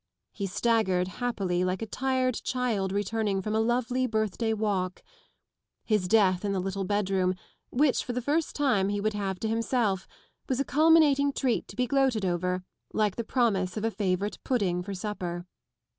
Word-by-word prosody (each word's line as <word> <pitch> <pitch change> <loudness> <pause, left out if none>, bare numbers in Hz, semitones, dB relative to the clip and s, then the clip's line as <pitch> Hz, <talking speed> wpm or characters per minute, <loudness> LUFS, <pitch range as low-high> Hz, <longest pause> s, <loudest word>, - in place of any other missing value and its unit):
He 200 -2 -4
staggered 190 -3 +1
happily 190 -4 -1
like 185 +3 -1
a - - -2
tired 255 +2 0
child 230 -7 -1
returning 205 0 0
from 210 +3 -3
a 220 - +2
lovely 245 +2 +1
birthday 220 0 -1
walk: 200 -4 -1 0.8
his 210 -5 +1
death 190 -3 +3
in 200 -1 0
the 190 - 0
little 195 +1 -2
bedroom, 190 -2 +1 0.3
which 275 +1 +2
for 250 - -4
the 250 - -1
first 295 +6 0
time 245 -10 +2
he 205 0 -1
would 215 +1 0
have 195 -3 -3
to 220 - 0
himself, 225 -4 0 0.4
was 260 -1 0
a 275 - +1
culminating 295 -2 +4
treat 260 -3 0
to - - -11
be 250 - +1
gloated 265 -6 +1
over 180 +1 -1 0.3
like 210 -3 +1
the 235 - -3
promise 210 -7 0
of 215 - -1
a 225 - +1
favourite 200 0 -2
pudding 195 -9 0
for 195 +2 -5
supper. 180 -3 -4
210 Hz, 175 wpm, -28 LUFS, 190-245 Hz, 0.8 s, culminating